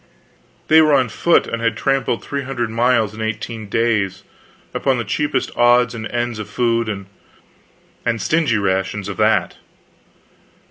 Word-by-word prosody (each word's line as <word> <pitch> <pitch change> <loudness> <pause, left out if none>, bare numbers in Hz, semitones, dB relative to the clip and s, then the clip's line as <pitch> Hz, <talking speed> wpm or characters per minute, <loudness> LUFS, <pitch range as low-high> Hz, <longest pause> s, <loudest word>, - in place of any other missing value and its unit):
They 160 +1 +7
were 155 -2 +4
on 130 -3 +2
foot, 170 +10 +2
and 115 - -4
had 115 -1 0
tramped 135 -3 0
three 140 0 -3
hundred 125 -4 -3
miles 115 -2 +2
in 110 - -8
eighteen 110 0 -4
days, 110 -4 0 0.5
upon 135 -2 +1
the 120 - -2
cheapest 135 +4 -2
odds 120 0 +4
and 115 -1 -5
ends 120 -2 -3
of 105 - -6
food, 115 -2 0
and 100 +3 -8
stingy 155 -1 +1
rations 95 0 -1
of 100 - -6
that. - - +1
115 Hz, 145 wpm, -19 LUFS, 110-125 Hz, 0.5 s, They